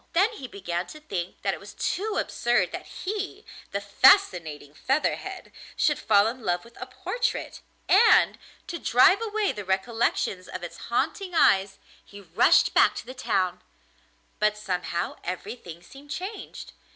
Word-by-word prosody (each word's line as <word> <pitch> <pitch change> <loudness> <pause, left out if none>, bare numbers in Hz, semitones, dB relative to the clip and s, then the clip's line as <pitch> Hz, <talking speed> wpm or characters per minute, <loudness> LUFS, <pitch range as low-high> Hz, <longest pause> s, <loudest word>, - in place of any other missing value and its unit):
Then 390 +7 +3
he 275 -12 -8
began 180 -5 -4
to 305 - -11
think 190 - -6
that - - +1
it - - -7
was - - -12
too 415 +3 -2
absurd 240 0 0
that - - -7
he, 405 +1 -5 0.2
the 200 - -2
fascinating 180 - +3
Featherhead, 270 - -2 0.2
should 295 -2 +1
fall 205 -2 +4
in 240 +3 -3
love 175 -3 -1
with 235 - -17
a - - -5
portrait; - - -3 0.3
and, 445 +4 +5 0.3
to 340 - -6
drive 380 - +5
away 430 -2 0
the 205 - -6
recollections 190 -1 -1
of 185 - -7
its 175 - -7
haunting 330 +9 -1
eyes, 195 -8 +3 0.3
he 205 - -13
rushed 190 +3 +3
back - - +5
to - - -6
the 255 - -8
town; 185 -7 -1 0.8
but 210 0 +2
somehow 180 -4 -3
everything 180 -2 -7
seemed 275 +9 -15
changed. 380 +7 -7
225 Hz, 150 wpm, -26 LUFS, -, 0.8 s, and